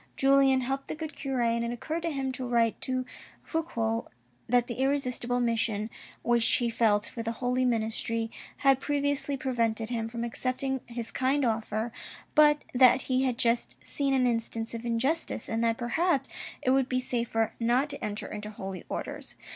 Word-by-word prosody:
Julien 270 -1 +5
helped 270 +2 -2
the - - -4
good 315 0 -6
cure, 265 -3 -2
and 235 0 +2
it 235 - -1
occurred 260 +8 -3
to 335 - -1
him 270 -3 -2
to 255 0 -4
write 235 -2 +2
to 255 -1 -1 0.4
Fouque 230 -9 -2 0.4
that 245 0 +4
the 240 0 -6
irresistible 250 -3 0
mission 225 -2 0 0.3
which 235 -1 +3
he 240 -1 +2
felt 210 -3 +3
for 235 - -5
the 230 0 -2
holy 250 +2 0
ministry 225 -1 -1 0.3
had 270 -1 +6
previously 285 0 0
prevented 230 -4 0
him 225 -2 -1
from 235 0 -4
accepting 255 +2 -2
his 235 -1 -4
kind 270 +1 +1
offer, 220 0 -1 0.4
but 295 -1 +5
that 255 0 +6
he 260 0 +1
had 250 -2 0
just 235 0 +1
seen 275 -1 0
an 255 -1 +3
instance 230 -1 -1
of 230 0 -5
injustice, 240 +4 0
and 225 +1 -1
that 230 0 +2
perhaps 275 +3 +1 0.4
it 255 - +3
would 265 -1 +3
be 255 - +1
safer 235 -3 -1
not 245 +4 +2
to 280 - -7
enter 210 0 -3
into 210 0 -6
Holy 195 -3 -6
Orders. - - -5
245 Hz, 175 wpm, -29 LUFS, 230-270 Hz, 0.4 s, had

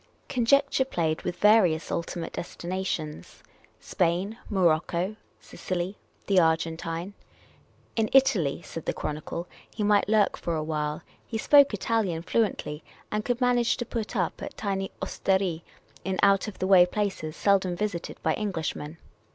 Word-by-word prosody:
Conjecture 275 +3 +3
played 165 -11 -1
with 175 - -3
various 185 -5 +4
ultimate 170 0 -3
destinations 175 -4 -5 0.2
— - - -32
Spain, 180 +3 +1
Morocco, 180 +1 +1 0.2
Sicily, 185 +2 -4 0.3
the 195 -2 +4
Argentine. 165 +2 0 0.8
In 220 -1 +1
Italy, 185 - +3
said 165 - -8
the - - +1
Chronicle, 155 +3 -4 0.2
he 210 - -3
might 205 0 +3
lurk 215 -2 +3
for 170 - -2
a 155 - -1
while 150 -1 -2
— - - -35
he 225 - -3
spoke 285 +5 +6
Italian 205 -5 -1
fluently, 180 -8 -1 0.3
and 210 0 -1
could 245 +1 -1
manage 245 -2 +2
to 240 - -3
put 230 -2 -4
up - - -1
at - - -7
tiny 195 -2 -2
ostcric 190 -4 0 0.4
in 190 -1 -2
out 200 +1 +4
of 210 - -7
the 185 - -2
way 185 -2 +7
places 190 -6 -3
seldom 190 -2 +2
visited 190 -3 -3
by - - +2
Englishmen. 165 -6 -3
190 Hz, 145 wpm, -27 LUFS, 165-210 Hz, 0.8 s, way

